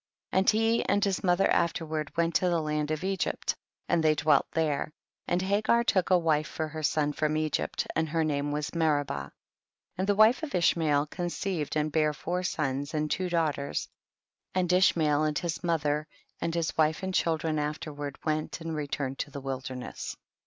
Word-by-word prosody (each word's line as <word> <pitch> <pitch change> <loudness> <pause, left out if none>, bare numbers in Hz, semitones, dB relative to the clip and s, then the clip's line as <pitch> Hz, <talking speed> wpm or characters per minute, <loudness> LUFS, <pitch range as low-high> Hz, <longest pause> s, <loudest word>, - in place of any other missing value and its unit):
17. - - 0
And 190 - +4 0.3
he - - -5
and 205 +1 +2
his 195 -2 -1
mother 180 +1 +3
after 170 0 +1
ward 155 -1 -3
went 170 0 +2
to 180 - +2
the 170 -1 +2
land 150 -1 -1
of 155 +2 -2
Egypt, 190 -1 -1 0.3
and 165 - +2
they 155 -1 +4
dwelt 145 -1 +3
there, 155 -2 0 0.4
and 175 +1 +1
Hagar 215 +4 +2
took 185 -6 +2
a 185 - +6
wife 155 -3 +1
for 160 - -3
her 155 +1 -6
son 150 0 +1
from 155 +1 0
Egypt, 155 -1 -1
and 160 0 0
her 165 +1 +1
name 145 -1 -1
was 150 0 -3
Meribah. 155 -4 +1
1 70 - -4
8. - - -20 0.7
And 190 - 0
the 205 - +3
wife 215 +6 +5
of 315 -3 -4
Ishmael 155 -4 +3
con 175 +3 -4
ceived 175 -4 -3
and 155 0 0
bare 155 0 +2
four 175 +5 -2
sons 145 -4 -2
and 150 0 -1
twc 185 -1 0
daughters, 155 -5 -1 0.7
and 180 -1 +2
Ishmael 155 -5 +4
and 150 -1 0
his 170 0 -3
mo 170 -1 +2
I - - +1
ther 150 0 -1 0.3
and 165 - -1
his 165 -1 -1
wife 155 +2 +2
and 190 0 -2
children 160 -3 +1
after 150 +2 -3
I - - -11
ward 145 -1 -6
went 155 0 -1
and 165 -1 -4
returned 140 -2 -3
to - - -2
the 140 0 -7
wil 135 -1 -3
derness. 130 -1 -6
155 Hz, 210 wpm, -29 LUFS, 150-175 Hz, 0.7 s, a